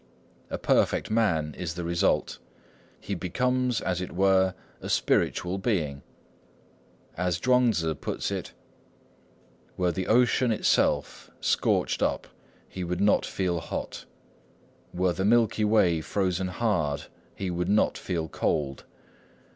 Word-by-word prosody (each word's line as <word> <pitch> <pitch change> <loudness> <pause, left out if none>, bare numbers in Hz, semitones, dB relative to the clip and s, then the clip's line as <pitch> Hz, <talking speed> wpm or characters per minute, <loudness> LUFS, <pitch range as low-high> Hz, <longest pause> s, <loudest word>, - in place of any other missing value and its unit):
A - - -3
perfect - - +1
man 80 -10 +1
is 85 -3 -4
the 90 - -4
result. 85 0 0 0.6
He 100 - -5
becomes, 125 +7 0
as 90 -1 -1
it 90 - -5
were, 95 0 +3 0.3
a - - -6
spiritual 90 +2 +1
being. 80 - -1 1.1
As 90 -1 -1
Chuang 125 +2 +4
Tzŭ 80 -6 -2
puts - - -3
it:— - - -4 1.3
"Were 90 -1 +1
the 95 +2 -3
ocean 125 +1 +3
itself 110 - +1
scorched - - +1
up, - - 0 0.4
he 95 - -6
would 90 0 -3
not 100 +1 +3
feel 90 -3 -1
hot. 80 - -6 0.9
Were 90 0 +1
the 95 - -2
Milky 110 0 +3
Way 90 -7 +3
frozen 95 +1 -1
hard, 90 -8 -1 0.3
he 95 -2 -3
would 90 +1 -2
not 105 +1 +3
feel 85 -4 -3
cold. 70 -3 -2
90 Hz, 125 wpm, -27 LUFS, 85-105 Hz, 1.3 s, Chuang